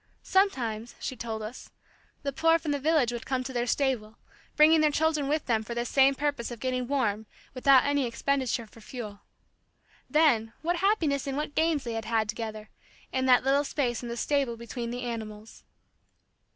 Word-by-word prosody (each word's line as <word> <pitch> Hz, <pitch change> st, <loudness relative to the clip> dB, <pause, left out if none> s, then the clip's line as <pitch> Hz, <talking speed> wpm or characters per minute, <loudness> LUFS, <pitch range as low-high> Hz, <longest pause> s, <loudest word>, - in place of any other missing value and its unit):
Sometimes, 245 Hz, -, 0 dB
she 260 Hz, -, -4 dB
told 220 Hz, -2 st, -5 dB
us, 220 Hz, +4 st, -8 dB, 0.5 s
the 280 Hz, -1 st, -2 dB
poor 325 Hz, +3 st, +4 dB
from 315 Hz, -2 st, -3 dB
the 285 Hz, -, 0 dB
village 295 Hz, -4 st, +2 dB
would 240 Hz, -1 st, -5 dB
come 260 Hz, -1 st, -1 dB
to 260 Hz, +1 st, -6 dB
their 240 Hz, 0 st, -1 dB
stable, 240 Hz, -6 st, -1 dB, 0.4 s
bringing 310 Hz, +1 st, +6 dB
their 305 Hz, -, +4 dB
children 305 Hz, -1 st, +1 dB
with 300 Hz, +1 st, 0 dB
them 225 Hz, -3 st, +1 dB
for 235 Hz, +2 st, -6 dB
this 240 Hz, 0 st, -2 dB
same 275 Hz, 0 st, +4 dB
purpose 285 Hz, -4 st, -2 dB
of 240 Hz, -2 st, -8 dB
getting 255 Hz, 0 st, -2 dB
warm 220 Hz, -6 st, 0 dB, 0.3 s
without 260 Hz, 0 st, +5 dB
any 285 Hz, -2 st, +1 dB
expenditure 255 Hz, -1 st, -1 dB
for 225 Hz, +1 st, -17 dB
fuel. 215 Hz, -3 st, -8 dB, 0.9 s
Then, 245 Hz, -8 st, +3 dB
what 345 Hz, +2 st, 0 dB
happiness 335 Hz, -8 st, +1 dB
and 275 Hz, 0 st, -2 dB
what 300 Hz, 0 st, -3 dB
games 315 Hz, -2 st, +1 dB
they 235 Hz, -1 st, -4 dB
had 220 Hz, -1 st, 0 dB
together, 215 Hz, 0 st, -5 dB, 0.4 s
in 260 Hz, 0 st, 0 dB
that 250 Hz, -1 st, +5 dB
little 275 Hz, +2 st, +3 dB
space 255 Hz, -5 st, -1 dB
in 240 Hz, -, -6 dB
the 235 Hz, -, -4 dB
stable 275 Hz, -3 st, 0 dB
between 235 Hz, 0 st, -5 dB
the 245 Hz, +1 st, -4 dB
animals! 220 Hz, -2 st, -7 dB
255 Hz, 180 wpm, -28 LUFS, 230-285 Hz, 0.9 s, bringing